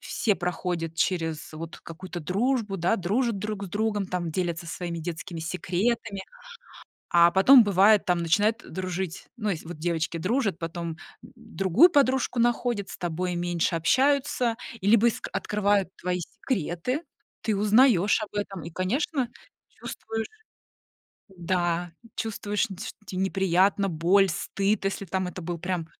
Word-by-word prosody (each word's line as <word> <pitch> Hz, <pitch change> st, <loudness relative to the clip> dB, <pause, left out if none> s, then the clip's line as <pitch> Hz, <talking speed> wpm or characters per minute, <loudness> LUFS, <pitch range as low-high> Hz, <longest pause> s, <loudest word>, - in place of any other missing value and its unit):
все 210 Hz, -, 0 dB
проходят 175 Hz, -2 st, -3 dB
через 165 Hz, -2 st, -1 dB
вот 165 Hz, +1 st, -7 dB
какую-то 175 Hz, +1 st, -8 dB
дружбу, 205 Hz, -, 0 dB
да, 175 Hz, +7 st, +2 dB
дружат 215 Hz, +4 st, 0 dB
друг 210 Hz, 0 st, -4 dB
с -, -, -7 dB
другом, 205 Hz, +1 st, -1 dB
там, 180 Hz, -2 st, -3 dB
делятся 170 Hz, 0 st, -2 dB
своими 170 Hz, 0 st, -4 dB
детскими 165 Hz, 0 st, -5 dB
секретами, 190 Hz, +5 st, -1 dB, 0.9 s
а 170 Hz, 0 st, +7 dB
потом 225 Hz, +7 st, +7 dB
бывает, 200 Hz, +1 st, +5 dB
там 175 Hz, -1 st, +2 dB
начинают 205 Hz, +8 st, +2 dB
дружить. 185 Hz, -1 st, -4 dB
Ну, 215 Hz, -4 st, -2 dB
ес 175 Hz, -5 st, -2 dB
вот 170 Hz, 0 st, -7 dB
девочки 170 Hz, +1 st, -1 dB
дружат, 200 Hz, +1 st, 0 dB
потом, 170 Hz, 0 st, -4 dB
м, 160 Hz, -, -9 dB, 0.4 s
другую 195 Hz, -, +4 dB
подружку 265 Hz, -5 st, +2 dB
находят, 240 Hz, -3 st, +1 dB
с -, -, -8 dB
тобой 175 Hz, +1 st, -2 dB
меньше 175 Hz, 0 st, 0 dB
общаются, 255 Hz, -, +2 dB, 0.2 s
и 195 Hz, -, -3 dB
либо 230 Hz, +2 st, +6 dB
иск 235 Hz, -, -2 dB
открывают 205 Hz, -2 st, +1 dB
твои 180 Hz, 0 st, -2 dB
секреты. 195 Hz, -, -3 dB, 0.4 s
Ты 215 Hz, -3 st, 0 dB
узнаёшь 210 Hz, -1 st, +4 dB
об 215 Hz, -, -7 dB
этом 200 Hz, -4 st, -4 dB
и, 165 Hz, -, -7 dB
конечно, 250 Hz, -, -1 dB, 0.4 s
чувствуешь 225 Hz, 0 st, -6 dB, 1.0 s
м-да, 175 Hz, -1 st, -1 dB, 0.2 s
чувствуешь, 210 Hz, +1 st, -1 dB
нь 190 Hz, -, -7 dB
те 205 Hz, -, -6 dB
что -, -, -9 dB
те 185 Hz, -, -6 dB
неприятно, 190 Hz, +1 st, +2 dB
боль, 185 Hz, +4 st, +3 dB
стыд, 195 Hz, +5 st, -1 dB
если 195 Hz, 0 st, -2 dB
там. 185 Hz, 0 st, -2 dB
Это 180 Hz, -, -7 dB
был 170 Hz, +1 st, -4 dB
прям 175 Hz, -1 st, -3 dB
190 Hz, 145 wpm, -26 LUFS, 175-215 Hz, 1.0 s, а